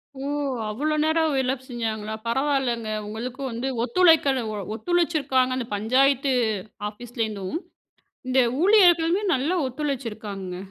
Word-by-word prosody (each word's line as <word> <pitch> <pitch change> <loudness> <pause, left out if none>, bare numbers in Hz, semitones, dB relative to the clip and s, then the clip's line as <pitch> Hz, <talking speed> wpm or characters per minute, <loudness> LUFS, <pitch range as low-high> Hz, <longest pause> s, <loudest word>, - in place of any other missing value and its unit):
ஓ! - - -10 0.5
அவ்ளோ 290 +9 -1
நேரம் 315 -1 +2
வேல 265 -1 +1
செஞ்சாங்களா? 220 -4 -3
பரவாயில்லங்க. 245 -3 0 0.2
உங்களுக்கு 240 +5 -6
வந்து 235 +3 -3 0.2
ஒத்துழைக்கல 280 -2 +4 0.3
ஒத்துழைச்சிருக்காங்க. 295 -5 +1
அந்த 245 -3 -4
பஞ்சாயத்து 265 +5 +2 0.6
ஆஃபீஸ்லேருந்தும். 220 -2 -4 0.7
இந்த 260 +1 +4 0.2
ஊழியர்களுமே 360 -2 +5
நல்லா 290 +8 0
ஒத்துழைச்சிருக்காங்கங்க. 225 -9 -4
260 Hz, 95 wpm, -24 LUFS, 230-305 Hz, 0.7 s, ஊழியர்களுமே